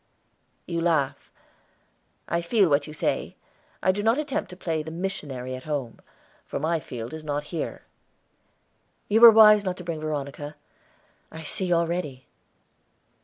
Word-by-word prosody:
"You 170 -1 -2
laugh. 145 -5 0 1.0
I 170 - 0
feel 195 +1 +3
what 145 0 +2
you 155 - -8
say. - - -2 0.5
I 185 - +5
do 200 +2 -3
not 225 +4 +3
attempt 300 -2 -2
to 180 - -10
play 165 -3 -2
the 155 - -7
missionary 150 -8 -5
at 130 0 -8
home, 140 -7 -4 0.5
for - - -3
my 160 +3 0
field 120 -4 -7
is 160 -1 -7
not 145 -1 -2
here." 165 - -4 1.3
"You 220 +2 +3
were 235 - +13
wise 215 -2 +7
not 185 -2 -2
to 180 - -8
bring 165 -2 -4
Veronica, 145 -1 -4 0.8
I 160 0 -8
see 185 +3 -1
already." 170 -6 -1
160 Hz, 150 wpm, -25 LUFS, 145-185 Hz, 1.3 s, were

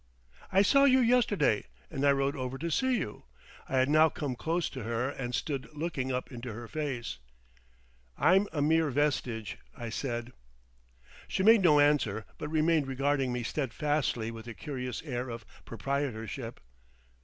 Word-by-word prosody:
"I 195 +1 +5
saw 275 +6 +5
you 260 -1 +6
yesterday. 230 - +3 0.3
And 135 - -3
I 140 - +6
rode 140 0 +1
over 130 0 -4
to 165 +4 -3
see 260 - +2
you." 105 - -5 0.4
I 135 - 0
had 130 0 +4
now 155 +2 +5
come 145 -4 -4
close 165 +6 -1
to 130 - -6
her, 115 +3 -1
and 125 -3 -4
stood 135 -1 -3
looking 145 -5 -2
up 125 +2 -3
into 120 -1 -6
her 120 +2 -8
face. 135 - -4 1.0
"I'm 185 +8 +4
a 150 -3 0
mere 160 +1 +3
vestige," 130 -6 -1 0.2
I 120 -1 -5
said. 120 0 -4 0.9
She 190 - -1
made 225 +1 +7
no 155 -5 +6
answer, 140 -8 +2
but 150 - -4
remained 155 -2 +2
regarding 135 0 0
me 125 0 -2
steadfastly 135 -3 -1
with 115 0 -9
a 115 - -7
curious 125 -5 -5
air 125 -4 -3
of 115 -2 -7 0.2
proprietorship. 120 -3 -3
135 Hz, 160 wpm, -30 LUFS, 120-155 Hz, 1.0 s, made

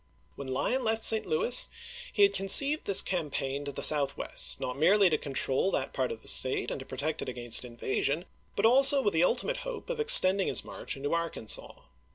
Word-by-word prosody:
When 140 - -10
Lyon 245 - -3
left 225 0 -2
St. 220 -1 +3
Louis 155 +10 +3 0.4
he 410 - 0
had 400 0 +2
conceived 280 +10 +4
this 200 - +3
cam 175 -5 -4
paign 140 +1 -5
to 140 - -6
the - - -9
southwest, 140 -2 0
not 125 - -6
merely 190 +5 +2
to 155 - 0
control 135 +4 -2
that 135 -8 -5
part 130 -2 -4
of 110 - -10
the - - -16
State 130 - +4
and - - -6
to 135 - -12
protect 145 +4 -5
it - - -7
against 120 -2 0
in 120 -1 -14
vasion, 145 +7 -4 0.3
but 200 - -2
also 270 +3 +6
with 205 - -2
the 165 +1 0
ultimate 445 - -1
hope - - -8
of - - -7
extend 200 - +5
ing - - -3
his - - -3
march - - -9
into 145 +3 -5
Arkansas. 170 -10 -5
170 Hz, 210 wpm, -27 LUFS, 135-225 Hz, 0.4 s, also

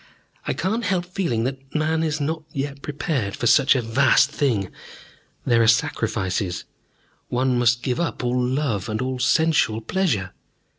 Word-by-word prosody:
I - - +1
cannot 220 +4 -2
help 180 -2 0
feeling 175 -11 -1
that 135 +2 -5
man 160 +1 +1
is 155 -2 -1
not 155 +2 -2
yet 140 0 -4
prepared 140 - -2
for - - -4
such 130 +4 +5
a 125 - 0
vast 130 +4 +3
thing. 115 -11 0 0.7
There 120 -1 +3
are 115 - +3
sacrifices. 100 -5 0 0.6
One 125 0 +1
must 120 0 +2
give 125 -2 -1
up 170 -6 -2
love 125 -4 -1
and 110 0 -2
all 130 0 -2
sensual 150 -4 +2
pleasure. 115 - -1
130 Hz, 150 wpm, -23 LUFS, 115-155 Hz, 0.7 s, such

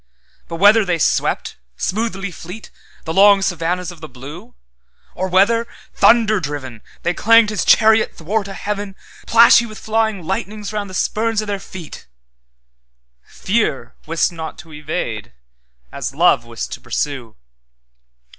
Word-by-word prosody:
But 165 - -6
whether 205 +5 +5
they 180 -3 0
swept, 160 - 0 0.2
smoothly 200 -2 -2
fleet, 180 +6 -10 0.3
The 160 - -3
long 200 +1 +6
savannahs 180 -1 -2
of 170 -2 -15
the 155 - -9
blue; 135 - -11 0.6
Or 185 - -3
whether, 220 +6 +3 0.3
Thunder 220 -3 +4
driven, 140 -7 -6 0.2
They 175 - 0
clanged 225 +2 +4
his 210 - -1
chariot 220 0 +4
'thwart 200 +5 -2
a 195 - -7
heaven, 205 -1 -4 0.3
Plashy 235 +1 +6
with 215 -1 -10
flying 220 -3 -1
lightnings 205 +3 -4
round 205 -2 -3
the 185 - -8
spurn 225 +3 0
o' 215 - -2
their 205 -1 -3
feet:—Fear - - -7
wist 165 +2 +1
not 160 -2 -7
to 165 -2 -13
evade 150 - -5 0.6
as - - -5
Love - - +3
wist - - -6
to - - -7
pursue. 130 -7 -4
185 Hz, 135 wpm, -19 LUFS, 150-215 Hz, 0.6 s, long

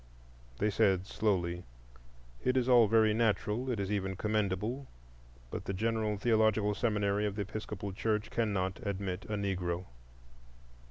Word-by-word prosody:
They 105 +1 +1
said 95 -3 +3
slowly, 90 -5 0 0.8
"It 130 +1 +2
is 125 -1 +2
all 120 -3 +7
very 110 0 +4
natural—it 115 +2 0
is 100 0 -2
even 95 -2 -1
commendable; 110 +5 -1 0.6
but - - -5
the 95 - -2
General 110 0 0
Theological 110 -1 +3
Seminary 105 -2 +1
of 100 - -4
the 105 - -1
Episcopal 100 -1 -5
Church 105 +2 -1
cannot 100 -5 0
admit 100 -1 -3
a 110 - -3
Negro." 90 -3 -2
105 Hz, 130 wpm, -32 LUFS, 95-110 Hz, 0.8 s, all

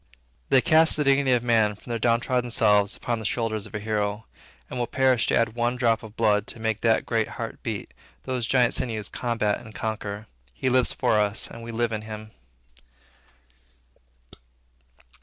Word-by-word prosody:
They 130 - +5
cast 160 0 +5
the 150 - +1
dignity 140 -1 +3
of 120 -1 +1
man 110 -3 +2
from 110 - -11
their 115 - -2
downtrod 120 +2 +1
selves 105 -2 +3
upon 120 -2 -2
the - - -7
shoulders 110 -1 -2
of - - -11
a - - -2
hero, 105 0 -2 0.4
and 125 - -6
will 120 - -1
perish 130 -2 +2
to - - +2
add 115 -1 +1
one 120 +1 0
drop 115 -3 +1
of 110 0 -12
blood 105 -2 +2
to - - -7
make 110 -1 -2
that 115 -1 +2
great 115 -2 0
heart - - -6
beat, - - -5 0.3
those 125 -3 -2
giant 125 -3 +3
sinews 110 -5 -2
combat 115 -4 -1
and 110 -3 -13
conquer. 105 -1 -4 0.3
He 130 - -1
lives 130 -1 +3
for 110 - +1
us, 105 0 0
and 115 - -9
we 115 0 -7
live 115 0 -1
in 110 -1 -3
him. 110 0 -8
115 Hz, 180 wpm, -25 LUFS, 110-125 Hz, 0.4 s, They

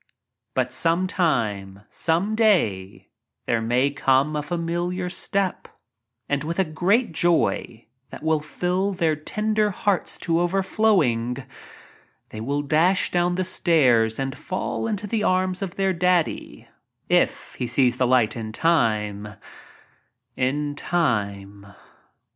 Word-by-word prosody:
But - - 0
some 170 +3 +2
time— 105 - -1
some 170 +6 0
day 170 - +1 0.2
— - - -58
there 115 -1 0
may 125 +5 +1
come 140 +1 +2
a 150 - 0
familiar 175 +3 -3
step 195 0 -2 0.3
— 115 0 -57
and 140 0 -1
with 165 +2 -4
a 190 - +3
great 180 +9 +1
joy, 160 -8 0 0.2
that - - -10
will 160 -1 +2
fill 180 +6 -2
their 165 -4 +1
tender 215 +7 0
hearts 200 -1 -1
to 165 -1 +2
overflowing, 175 - +1 0.8
they 110 - -8
will 140 +5 -2
dash 165 +6 +2
down 175 0 +1
the 185 - 0
stairs 125 -12 +2
and 135 0 -3
fall 185 +4 -3
into 210 -2 -3
the 215 +1 -1
arms 185 -1 0
of 190 -3 -4
their 195 -1 +1
"Daddy" 180 -1 0 0.2
— - - -56
if - - +1
he 125 - -1
sees 125 0 +2
the 125 - +2
light 120 -4 +3
in 110 -2 -5
time—in 125 - -3
time. 100 - -2
155 Hz, 130 wpm, -23 LUFS, 120-185 Hz, 0.8 s, a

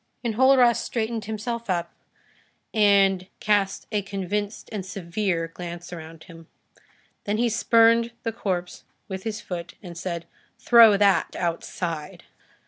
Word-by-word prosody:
Enjolras 245 +1 +4
straightened 225 -2 -3
himself 225 +1 -4
up, 175 -2 -1 0.8
and 195 -3 +4
cast 205 -2 +1
a 210 -2 +1
convinced 200 +2 -4
and 210 -3 -4
severe 180 -2 -2
glance 175 +1 -8
around 160 -1 -10
him. 165 -3 -14 0.8
Then 205 +1 0
he 240 +1 +2
spurned 230 +1 +4
the 230 - -1
corpse 180 -5 -3 0.2
with 190 +1 -6
his 220 -1 -3
foot 170 -2 -6
and 175 -2 -9
said:— 170 -1 -4 0.3
"Throw 230 -4 +7
that 200 -1 +2
outside." 170 -2 -4
200 Hz, 125 wpm, -24 LUFS, 175-220 Hz, 0.8 s, Throw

